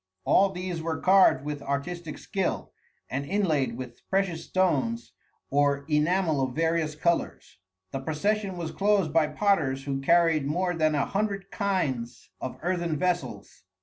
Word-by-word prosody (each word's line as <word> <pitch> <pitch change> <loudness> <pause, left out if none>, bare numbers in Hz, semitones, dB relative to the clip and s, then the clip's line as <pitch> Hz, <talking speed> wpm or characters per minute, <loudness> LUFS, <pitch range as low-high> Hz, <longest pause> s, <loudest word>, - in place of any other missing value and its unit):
All 195 +1 +5
these 180 -2 -4
were 160 0 -2
carved 185 -8 +5
with 150 -1 -4
artistic 155 +4 -4
skill, 195 -3 -3 0.4
and 135 +3 -3
inlaid 145 - 0
with 125 -2 -8
precious 190 -4 0
stones 230 +5 0 0.4
or 140 0 +2
enamel 160 0 +2
of 130 -2 -2
various 160 -1 0
colors. 170 +2 -1 0.3
The 135 - -3
procession 190 +7 -1
was 165 -2 -4
closed 200 -6 +1
by 160 -2 +4
potters 150 -6 +1
who 135 -1 -3
carried 165 -1 +3
more 175 +4 0
than 155 -2 +1
a 145 - +1
hundred 200 -1 -2
kinds 135 - -2
of 130 - -5
earthen 170 -3 -1
vessels. 180 +1 -2
165 Hz, 145 wpm, -27 LUFS, 145-190 Hz, 0.4 s, All